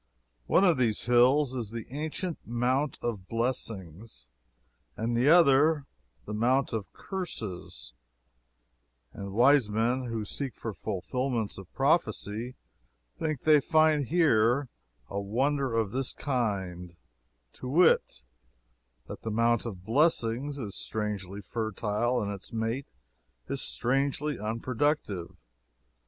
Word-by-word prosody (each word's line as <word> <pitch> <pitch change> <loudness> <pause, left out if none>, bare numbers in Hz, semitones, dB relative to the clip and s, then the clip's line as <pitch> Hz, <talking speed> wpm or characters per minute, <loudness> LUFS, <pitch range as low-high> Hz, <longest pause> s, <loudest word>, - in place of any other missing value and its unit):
One 190 - +4
of 175 -8 +4
these 115 -4 +2
hills 125 +3 +4
is 120 -5 -3
the 115 0 -6
ancient 155 +4 -3
Mount 125 +4 0
of 105 -6 -3
Blessings 105 - -4 0.7
and 115 +1 -1
the 125 +5 +3
other 150 -2 +5 0.4
the 105 - -5
Mount 125 +5 +2
of 110 -3 -3
Curses 110 - -6 1.2
and 100 -1 -7
wise 125 +2 +5
men 120 +5 0
who 115 -3 -3
seek 135 +4 -4
for 115 - -5
fulfillments 110 +4 -2
of 95 -2 -12
prophecy 125 -5 0 0.6
think 155 -5 -2
they 155 -2 +5
find 155 -2 +3
here 140 -5 +3 0.4
a 100 - -3
wonder 135 +7 0
of 110 -3 +1
this 130 +1 -1
kind 95 - -2 0.6
to 130 - -8
wit, 160 - +3 0.8
that - - -8
the 115 - -4
Mount 115 +1 +2
of 95 -5 -8
Blessings 135 +1 +1
is 105 -8 -5
strangely 105 -2 -4
fertile 110 +3 -1
and 100 - -3
its 100 +2 -7
mate 115 +4 -2 0.6
as 140 - -2
strangely 140 +4 0
unproductive. 115 - -1
120 Hz, 115 wpm, -29 LUFS, 105-140 Hz, 1.2 s, other